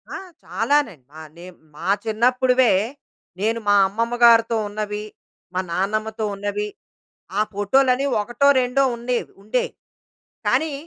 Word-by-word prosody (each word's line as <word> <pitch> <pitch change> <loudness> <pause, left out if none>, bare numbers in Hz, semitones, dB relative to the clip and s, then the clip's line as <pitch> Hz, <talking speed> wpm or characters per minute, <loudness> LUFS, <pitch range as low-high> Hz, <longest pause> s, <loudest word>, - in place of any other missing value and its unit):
ఆ! - - -3 0.3
చాలానే. 225 - 0 0.2
ఆహ్, 155 -1 -10
నేం 180 +1 -11 0.2
మా 150 - -7 0.2
చిన్నప్పుడివే. 250 +2 +3 0.7
నేను 225 +3 0
మా 205 - +5
అమ్మమ్మ 230 +4 -2
గారితో 230 -1 +6
ఉన్నవి, 210 0 -4 0.5
మా 185 - -1
నాన్నమ్మతో 215 +4 -1
ఉన్నవి, 205 +1 -3 0.7
ఆ - - +4
ఫోటోలని 255 +6 +2 0.2
ఒకటో, 240 +6 +1
రెండో 250 +2 +1
ఉండేవి, 240 +1 -3
ఉండేయి. 230 +4 -1 0.8
కానీ, 315 -2 +1
225 Hz, 115 wpm, -22 LUFS, 205-250 Hz, 0.8 s, గారితో